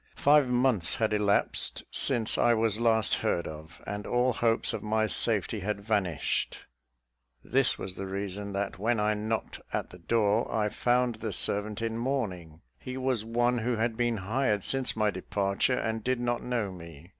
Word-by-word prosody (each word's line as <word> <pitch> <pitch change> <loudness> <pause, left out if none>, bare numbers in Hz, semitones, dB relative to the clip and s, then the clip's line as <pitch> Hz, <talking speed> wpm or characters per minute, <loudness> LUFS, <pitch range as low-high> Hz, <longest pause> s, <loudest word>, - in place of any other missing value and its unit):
Five 145 -1 +4
months 125 -8 +2
had 110 -1 0
elapsed 105 -1 +2
since 120 -5 +2
I 120 - +3
was 110 -1 +2
last 115 -2 +2
heard 85 - 0
of, 80 +1 -10
and 105 +1 -5
all 125 +1 +2
hopes 115 0 +1
of - - -4
my 110 +1 0
safety 110 -1 +2
had 100 +1 -3
vanished: 100 -6 -1 0.9
this 135 0 +2
was 95 - -5
the 95 +1 -6
reason 100 +1 -4
that 100 -1 -3
when 115 +2 +1
I 105 0 +2
knocked 110 +1 -3
at - - -3
the 90 - -13
door, 110 +3 +1
I 105 -1 0
found 120 +1 +1
the 110 -1 -4
servant 105 +3 +1
in 115 0 -2
mourning: 95 - -3 0.2
he 130 0 -7
was 130 -4 -1
one 120 +2 +1
who 120 +2 -1
had 115 +1 -1
been 120 -1 0
hired 105 +1 0
since 135 -1 0
my 105 -1 +1
departure, 100 +5 -1
and 110 -1 -2
did 130 -1 0
not 120 0 -1
know 115 -5 -2
me. 85 -3 -12
110 Hz, 175 wpm, -28 LUFS, 100-120 Hz, 0.9 s, Five